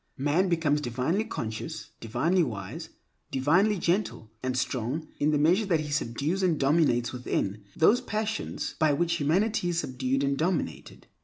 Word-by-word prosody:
Man 150 +8 +2
becomes 155 -4 +1
divinely 130 - -1
conscious, 110 - -5
divinely 145 - +1
wise, 125 - -4 0.4
divinely 175 +11 +3
gentle 170 - -1
and 130 0 -1
strong 130 +5 -2
in 145 - +2
the 150 - +2
measure 175 +8 +3
that 165 -5 +2
he 150 -1 -5
subdues 145 +7 -1
and 175 -5 +2
dominates 135 -4 +2
within, 105 -5 -2
those 220 +10 +4
passions 220 -2 -3
by 155 -2 +4
which 170 +3 +1
humanity 180 +6 +1
is 175 - -1
subdued 130 -1 -1
and 140 0 0
dominated. 175 +2 -2
155 Hz, 150 wpm, -28 LUFS, 130-175 Hz, 0.4 s, those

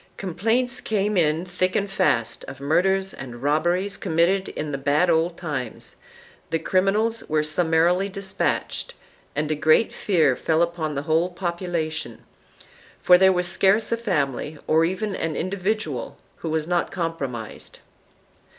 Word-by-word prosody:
Complaints 225 +7 0
came 210 -1 0
in 160 -1 +2
thick 185 +1 -1
and 200 - +1
fast 185 - 0
of 135 0 -9
murders 190 +7 +1
and 120 -2 -9
robberies 175 +7 +1
committed 175 +4 +1
in 150 -1 -4
the 140 - -2
bad 150 +6 +2
old 165 +1 +1
times; 145 -9 -5 0.5
the 165 - +1
criminals 200 +7 +1
were 155 0 +2
summarily 170 +4 +2
dispatched, 195 0 -2 0.4
and 150 +1 -1
a - - +1
great 155 +8 +3
fear 160 -10 +2
fell 160 +4 +1
upon 165 -3 -2
the 140 - -2
whole 160 +3 +1
population, 170 -3 -4 0.8
for 180 0 +6
there 190 0 +6
was 180 -1 0
scarce 200 +5 +2
a - - +3
family 155 - -2
or 160 +1 +3
even 195 +4 -2
an 160 -2 -2
individual 185 - -2 0.2
who 165 - -5
was 155 -1 -1
not 175 0 0
compromised. 140 - -5
170 Hz, 140 wpm, -24 LUFS, 155-190 Hz, 0.8 s, for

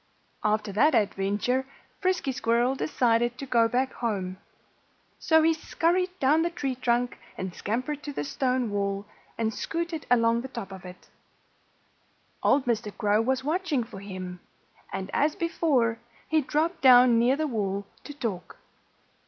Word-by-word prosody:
After 210 -1 0
that 270 +9 +4
adventure 210 +4 +1 0.4
Frisky 370 -7 +1
Squirrel 240 +1 +1
decided 240 -3 +1
to 275 - -6
go 235 -3 +3
back 255 +3 0
home. 190 -6 -3 0.8
So 320 -2 +4
he 325 +1 +4
scurried 360 +3 0
town 295 +4 +4
the 340 - +1
tree 280 -6 -3
trunk 245 0 0 0.2
and 185 -1 -4
scampered 255 +10 -3
to 290 - -6
the 270 - -3
stone 250 - -1
wall, 200 0 -2 0.3
and 225 -1 0
scooted 335 +2 -4
along 230 -1 +3
the 260 - -6
top 200 -7 -7
of 190 -1 -10
it. 180 0 -12 1.3
Old 280 - +3
Mr. 220 -3 -1
Crow 210 +1 +2
was 260 +2 0
watching 310 -3 0
for 225 -4 -10
him. 185 -2 -7 0.5
And 190 0 -5
as 295 +2 +2
before, 270 -9 +1 0.3
he 315 0 +2
dropped 315 +5 -1
down 250 -2 +7
near 245 +3 +4
the 310 +2 -1
wall 200 -6 -2 0.2
to 290 - -7
talk. 220 -10 -5
245 Hz, 150 wpm, -27 LUFS, 210-290 Hz, 1.3 s, down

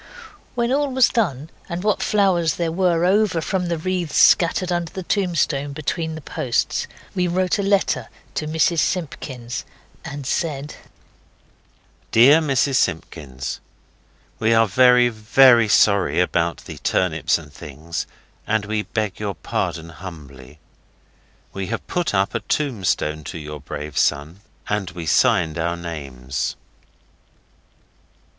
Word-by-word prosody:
When 240 0 0
all 285 0 +1
was 260 -2 +4
done, 160 - -1 0.2
and 170 +2 -4
what 210 -1 +1
flowers 185 -6 +2
there 170 -2 -1
were 175 -1 +2
over 195 -2 +2
from 180 +2 -2
the 170 -1 -1
wreaths 175 -1 -2
scattered 180 +1 +4
under 175 -1 -1
the 190 - -6
tombstone 170 -7 0
between 160 +2 -3
the 160 - -8
posts, 125 -3 -1 0.3
we 180 -1 0
wrote 185 +3 0
a - - +2
letter 195 - +1 0.2
to 155 - -3
Mrs 160 +2 +2
Simpkins, 130 -9 -3 0.4
and 140 -1 -7
said 145 +1 -2 1.4
DEAR 135 +7 +7
MRS 140 -2 +1
SIMPKINS 70 - -3 0.8
We 115 +1 +3
are 115 0 +5
very, 125 +3 +5
very 120 +1 +5
sorry 100 -3 +3
about 85 -1 0
the - - -9
turnips 80 -4 +1
and 75 -3 -13
things, 80 +5 -6 0.4
and 110 -1 0
we 105 +1 -1
beg 105 -2 -3
your 100 -2 -3
pardon 80 +1 -3
humbly. 75 -6 -11 1.0
We 95 -1 -4
have 115 - -4
put 175 -11 -1
up 95 +1 +1
a - - 0
tombstone 95 - -1
to - - -6
your 75 -1 -7
brave 75 0 -5
son. 75 +5 0 0.3
And 105 -3 -1
we 90 -2 -7
signed 80 +3 +2
our 85 +1 -1
names. 70 -6 -4
125 Hz, 135 wpm, -21 LUFS, -, 1.4 s, DEAR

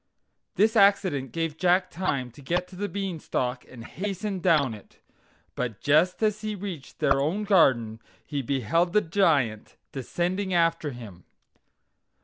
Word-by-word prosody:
This 220 +2 +3
accident 195 - +3
gave 165 0 -3
Jack 180 0 +2
time 140 -9 -2
to 125 - -15
get 175 +6 -2
on 180 - -10
the 205 0 -2
Bean 195 -4 -4
stalk 125 -3 -3
and 120 -3 -11
hasten 195 +1 -4
down 155 -9 +2
it; 105 - -14 0.5
but 120 -3 -4
just 155 - +2
as 215 0 +1
he 215 -1 -3
reached 185 -8 -7
their 135 0 +2
own 175 +9 -1
garden 125 - +3 0.3
he 145 -2 -3
beheld 140 - 0
the 210 - +5
Giant 150 - +1 0.2
descending 180 +8 -2
after 165 -2 +2
him. 110 - -10
165 Hz, 145 wpm, -26 LUFS, 130-190 Hz, 0.5 s, the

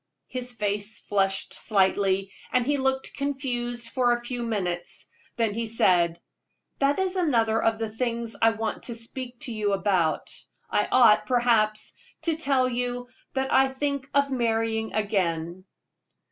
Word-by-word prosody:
His 250 -1 -4
face 205 -1 -2
flushed 195 -1 0
slightly, 195 -1 +1 0.2
and 250 -1 +2
he 290 +2 +2
looked 265 0 -1
confused 245 -4 -3
for 245 0 +2
a 240 0 -4
few 245 0 -3
moments. 190 -5 -2 0.3
Then 225 -3 +1
he 230 +1 -2
said: 175 -6 +3 0.6
"That 280 +1 +3
is 380 -1 0
another 230 -11 +2
of 225 0 +2
the 225 0 -2
things 230 +1 -3
I 225 - +7
want 225 -1 -3
to 235 - -4
speak 245 +2 -5
to 260 -6 -3
you 210 -2 0
about. 190 -5 +1 0.4
I - - +2
ought, 235 -4 +6
perhaps, 230 -4 +2 0.3
to 330 -2 +1
tell 275 -4 +2
you 245 0 -2 0.3
that 265 0 0
I 270 0 +6
think 275 0 -2
of 280 -1 +3
marrying 225 -2 0
again." 185 -4 -1
230 Hz, 145 wpm, -26 LUFS, 205-255 Hz, 0.6 s, I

